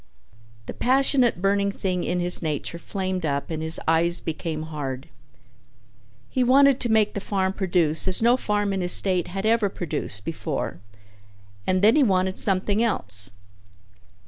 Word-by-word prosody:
The -, -, -7 dB
passionate 255 Hz, -5 st, +2 dB
burning 200 Hz, 0 st, +1 dB
thing 185 Hz, -2 st, -2 dB
in 180 Hz, -, -1 dB
his 175 Hz, 0 st, +3 dB
nature 155 Hz, +1 st, -3 dB
flamed 185 Hz, 0 st, -4 dB
up 140 Hz, 0 st, -2 dB
and 160 Hz, -1 st, -3 dB
his 160 Hz, +1 st, +3 dB
eyes 165 Hz, +2 st, +2 dB
became 155 Hz, -1 st, -4 dB
hard. 145 Hz, -3 st, -6 dB, 1.2 s
He 255 Hz, -, 0 dB
wanted 275 Hz, +1 st, +5 dB
to 240 Hz, -, -1 dB
make 220 Hz, -1 st, +2 dB
the -, -, -3 dB
farm 190 Hz, -2 st, -1 dB
produce 175 Hz, -4 st, 0 dB
as 185 Hz, -, +2 dB
no 235 Hz, +2 st, +4 dB
farm 205 Hz, -4 st, -1 dB
in 190 Hz, -, -2 dB
his 175 Hz, 0 st, +3 dB
state 185 Hz, -3 st, +1 dB
had 195 Hz, +3 st, -5 dB
ever 220 Hz, -2 st, +2 dB
produced 140 Hz, -, -4 dB
before 155 Hz, -, -4 dB, 0.9 s
and 185 Hz, +1 st, +1 dB
then 220 Hz, +3 st, +6 dB
he 305 Hz, -, +4 dB
wanted 190 Hz, -5 st, +1 dB
something 200 Hz, +2 st, +1 dB
else. 100 Hz, -, -1 dB
185 Hz, 155 wpm, -24 LUFS, 160-210 Hz, 1.2 s, then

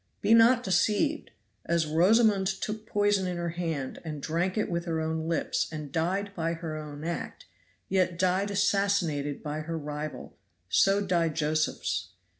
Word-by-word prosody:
Be -, -, +3 dB
not 235 Hz, +2 st, +6 dB
deceived! 210 Hz, -, +1 dB, 0.3 s
As 170 Hz, -1 st, +1 dB
Rosamond 195 Hz, +5 st, +4 dB
took 210 Hz, +3 st, -4 dB
poison 205 Hz, -2 st, +2 dB
in 180 Hz, -1 st, -3 dB
her 170 Hz, 0 st, -2 dB
hand, 165 Hz, -6 st, -3 dB
and 155 Hz, -3 st, -5 dB
drank 170 Hz, +7 st, -1 dB
it 215 Hz, -, +1 dB
with 170 Hz, -1 st, -2 dB
her 165 Hz, -2 st, -1 dB
own 160 Hz, 0 st, -2 dB
lips, 165 Hz, -, 0 dB
and 150 Hz, -3 st, -6 dB
died 190 Hz, +6 st, -1 dB
by 165 Hz, -1 st, -1 dB
her 165 Hz, -2 st, -5 dB
own 150 Hz, -1 st, -7 dB
act, 170 Hz, +1 st, -5 dB, 0.4 s
yet 185 Hz, -2 st, +1 dB
died 185 Hz, +2 st, +1 dB
assassinated 195 Hz, -8 st, 0 dB
by 150 Hz, 0 st, -3 dB
her 165 Hz, +1 st, -4 dB
rival 150 Hz, 0 st, -6 dB, 0.3 s
so 200 Hz, +1 st, +3 dB
died 170 Hz, -4 st, +1 dB
Josephs. 150 Hz, -, -1 dB
170 Hz, 155 wpm, -28 LUFS, 155-195 Hz, 0.4 s, not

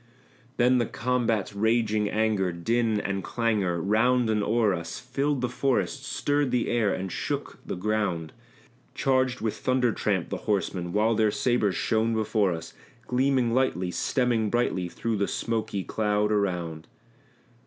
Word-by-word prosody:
Then 125 Hz, +1 st, +4 dB
the 120 Hz, -, 0 dB
combat's 115 Hz, -4 st, -1 dB
raging 110 Hz, 0 st, +1 dB
anger, 105 Hz, -4 st, +1 dB
din, 110 Hz, +5 st, 0 dB
and 100 Hz, -2 st, -2 dB
clangor, 105 Hz, -7 st, 0 dB
round 110 Hz, +5 st, +2 dB
and 105 Hz, -1 st, +1 dB
o'er 110 Hz, -1 st, +2 dB
us 85 Hz, -1 st, -5 dB
Filled 135 Hz, +2 st, -1 dB
the 125 Hz, -, +1 dB
forest, 135 Hz, +2 st, -1 dB
stirred 145 Hz, 0 st, 0 dB
the 125 Hz, -1 st, 0 dB
air, 115 Hz, -4 st, +2 dB
and 95 Hz, -1 st, -3 dB
shook -, -, -4 dB
the -, -, -4 dB
ground; 95 Hz, -5 st, -1 dB, 0.6 s
Charged 130 Hz, -2 st, +1 dB
with 110 Hz, -1 st, -2 dB
thunder 130 Hz, -2 st, +1 dB
tramp 100 Hz, -5 st, -1 dB
the -, -, -3 dB
horsemen, 95 Hz, -3 st, -1 dB
while 110 Hz, +3 st, +2 dB
their 110 Hz, -1 st, +3 dB
sabres 110 Hz, -3 st, +1 dB
shone 115 Hz, 0 st, +1 dB
before 110 Hz, -3 st, +1 dB
us, 80 Hz, -1 st, -6 dB, 0.3 s
Gleaming 125 Hz, -1 st, +1 dB
lightly, 105 Hz, -9 st, +1 dB
streaming 120 Hz, -1 st, +1 dB
brightly, 100 Hz, -6 st, 0 dB
through 115 Hz, +4 st, -2 dB
the 100 Hz, -, 0 dB
smoky 110 Hz, -4 st, -2 dB
cloud 105 Hz, 0 st, 0 dB
around. 90 Hz, -6 st, -1 dB
110 Hz, 145 wpm, -27 LUFS, 100-120 Hz, 0.6 s, Then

